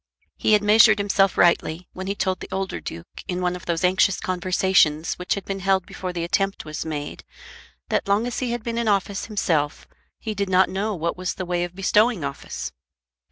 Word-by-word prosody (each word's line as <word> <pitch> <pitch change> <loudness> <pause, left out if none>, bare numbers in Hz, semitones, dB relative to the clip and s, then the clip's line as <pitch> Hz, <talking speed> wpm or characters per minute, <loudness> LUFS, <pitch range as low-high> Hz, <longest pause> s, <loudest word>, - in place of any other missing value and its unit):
He 215 - +2
had 210 -1 +4
measured 215 +1 +6
himself 200 -1 +2
rightly 170 0 +2
when 185 +1 -6
he 200 - -1
told 190 -2 -1
the - - -8
older 190 0 -3
duke 85 0 -8
in 180 -2 -2
one 180 0 0
of 180 - -10
those 170 +1 -1
anxious 185 +1 +3
conversations 180 -3 +2
which 180 - -1
had 200 - -6
been 195 0 -4
held 190 -1 +1
before 185 -1 -5
the 175 -1 -3
attempt 195 +2 -1
was 155 0 -5
made, 150 -2 -5 0.7
that - - 0
long 200 +3 +2
as 245 - -3
he 255 - -2
had 240 -2 -3
been 235 0 -2
in 235 - -1
office 200 -1 0
himself 160 -9 -1 0.3
he 220 - -4
did 200 -1 -2
not 185 0 +4
know 205 +2 -2
what 170 0 -2
was 185 0 -3
the 185 - -4
way 175 0 -1
of 175 0 -6
bestowing 210 0 +2
office. 140 0 -5
190 Hz, 205 wpm, -23 LUFS, 175-200 Hz, 0.7 s, measured